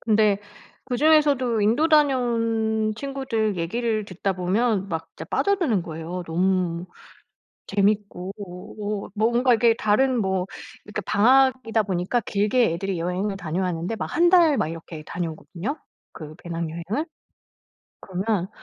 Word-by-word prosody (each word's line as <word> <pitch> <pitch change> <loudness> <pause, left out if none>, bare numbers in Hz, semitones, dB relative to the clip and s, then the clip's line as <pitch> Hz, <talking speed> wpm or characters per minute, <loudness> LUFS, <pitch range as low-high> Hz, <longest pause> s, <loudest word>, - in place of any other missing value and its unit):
근데 210 -2 +3 0.5
그중에서도 275 -4 +3
인도 235 +10 +3
다녀온 230 -7 +2
친구들 255 -6 -2
얘기를 215 +5 -1
듣다 195 +1 -2
보면 195 +3 0
막 160 -1 -4
진짜 - - -6
빠져드는 340 - +1
거예요. 165 +2 -6
너무 180 0 0 0.8
재밌고 200 -2 0 0.8
어 - - -17
뭔가 240 +4 +3
이게 230 0 +4
다른 250 +5 +2
뭐 190 -3 0 0.4
이렇게 210 0 -4
방학이다 250 0 +3
보니까 190 +4 -1
길게 210 0 +1
애들이 190 +2 -3
여행을 185 +4 -2
다녀왔는데 175 +2 -2
막 - - -3
1 345 +1 +5
달 335 -5 +5
막 205 - +1
이렇게 165 -1 -8
다녀오거든요 175 - -5 0.4
그 155 0 -9
배낭여행을. 170 - -3 1.0
그러면 190 0 -2
210 Hz, 285 characters per minute, -24 LUFS, 180-240 Hz, 1.0 s, 1